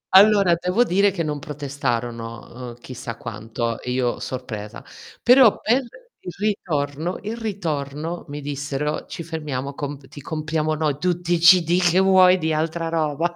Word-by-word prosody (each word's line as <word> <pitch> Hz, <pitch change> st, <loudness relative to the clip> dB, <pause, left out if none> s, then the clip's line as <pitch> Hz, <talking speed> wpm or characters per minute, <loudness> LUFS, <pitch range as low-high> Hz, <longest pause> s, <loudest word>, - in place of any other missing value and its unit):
Allora 200 Hz, -3 st, +7 dB
devo 180 Hz, +7 st, +2 dB
dire 200 Hz, -2 st, +3 dB
che 175 Hz, -3 st, -3 dB
non 150 Hz, -1 st, -3 dB
protestarono, 120 Hz, -4 st, -4 dB
uhm, 120 Hz, -, -10 dB
chissà 120 Hz, -2 st, -7 dB
quanto 115 Hz, +1 st, -4 dB
e 125 Hz, -, -6 dB
io 125 Hz, -1 st, 0 dB
sorpresa. 115 Hz, -4 st, -6 dB, 0.4 s
Però 250 Hz, -2 st, +6 dB
per 245 Hz, +5 st, +2 dB, 0.4 s
il 180 Hz, -, -7 dB
ritorno 165 Hz, -5 st, -2 dB
il 220 Hz, +3 st, -4 dB
ritorno 165 Hz, -7 st, -4 dB
mi 145 Hz, 0 st, -6 dB
dissero: 145 Hz, +1 st, -3 dB
"Ci 170 Hz, -, -6 dB
fermiamo 145 Hz, -4 st, -4 dB
comp 140 Hz, -1 st, -6 dB
ti 145 Hz, +1 st, -11 dB
compriamo 155 Hz, +1 st, -2 dB
noi 150 Hz, -2 st, -1 dB
tutti 175 Hz, 0 st, 0 dB
i 175 Hz, -, +2 dB
CD 170 Hz, +1 st, +6 dB
che 175 Hz, 0 st, +3 dB
vuoi 185 Hz, -1 st, +6 dB
di 160 Hz, -2 st, -1 dB
altra 165 Hz, +2 st, -1 dB
roba, 165 Hz, +1 st, -1 dB
155 Hz, 155 wpm, -22 LUFS, 140-180 Hz, 0.4 s, Allora